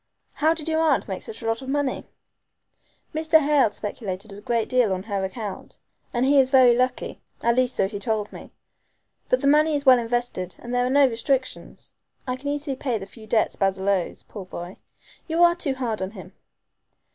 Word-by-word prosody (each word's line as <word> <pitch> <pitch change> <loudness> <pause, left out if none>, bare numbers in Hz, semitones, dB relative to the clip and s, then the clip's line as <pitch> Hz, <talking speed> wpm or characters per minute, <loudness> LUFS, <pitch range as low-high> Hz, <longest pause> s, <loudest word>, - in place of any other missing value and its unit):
How 315 +2 +2
did 320 -1 -4
your 320 0 +1
aunt 325 - +2
make - - -4
such 445 - -5
a - - -6
lot 225 +1 0
of 265 - -7
money?" 285 -1 -1 1.1
"Mr. 315 +1 +4
Hale 290 -5 +3
speculated 205 -1 -5
a 200 - -10
great 230 0 0
deal 250 -5 +2
on 185 0 -4
her 200 -2 -2
account, 200 +1 -6 0.3
and, 245 +1 +1
he 280 +1 +5
is 260 -1 +4
very 255 -3 +6
lucky. 250 +1 -1 0.2
At 235 0 +3
least 255 0 +2
so 190 - +2
he 205 0 -6
told 215 -2 -2
me. - - -11 0.8
But - - +2
the - - +1
money 305 +2 +4
is 285 0 -2
well 255 -2 +7
invested 235 -6 -2
and 240 +1 -8
there 245 0 +2
are - - -1
no 280 +1 +5
restrictions. 260 +2 -2 0.3
I 255 -1 -2
can 265 +2 -8
easily 285 -1 -2
pay 255 -3 -2
the 195 - -7
few 215 +2 -14
debts 220 +1 +1
Basil 195 0 0
owes, 190 -3 -1
poor 200 -4 -9
boy. 175 0 -8 0.5
You 330 +1 +2
are 345 0 +6
too 310 -6 -2
hard 235 -5 -3
on 190 - -2
him." 195 -5 -12
245 Hz, 205 wpm, -24 LUFS, 210-280 Hz, 1.1 s, well